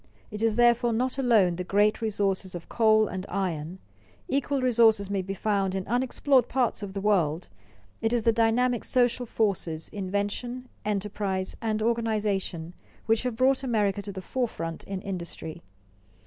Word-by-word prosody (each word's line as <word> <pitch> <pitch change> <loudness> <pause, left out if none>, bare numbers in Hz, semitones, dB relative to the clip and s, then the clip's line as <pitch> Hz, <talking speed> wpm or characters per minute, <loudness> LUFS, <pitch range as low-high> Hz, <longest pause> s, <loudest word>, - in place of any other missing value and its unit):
It 210 0 -6
is 225 -1 +2
therefore 240 0 +4
not 255 +4 -1
alone 215 -9 +3
the 180 - -2
great 205 +4 +2
resources 195 -4 -1
of 170 - -8
coal 220 -1 +4
and 185 0 -5
iron, 175 -3 -3 0.5
equal 280 -2 0
resources 225 -5 +3
may 195 -1 0
be 195 +1 -5
found 195 -2 0
in 190 -1 -3
unexplored 255 +2 +2
parts 250 -5 0
of 200 -2 -6
the 195 - -2
world, 175 -5 +1 0.5
it 225 - +1
is 240 -2 +1
the 230 - +4
dynamic 235 +2 +2
social 245 -1 +1
forces, 180 -8 -1
invention, 205 +6 -3 0.2
enterprise, 200 -2 -2
and 215 -1 -1
organization, 210 -7 -1 0.3
which 225 0 +2
have 250 -3 -2
brought 260 +3 +3
America 210 -6 0
to 200 0 -6
the 190 -1 -7
forefront 165 -11 -3
in 195 -1 -5
industry. 170 -4 -6
210 Hz, 155 wpm, -27 LUFS, 190-235 Hz, 0.5 s, therefore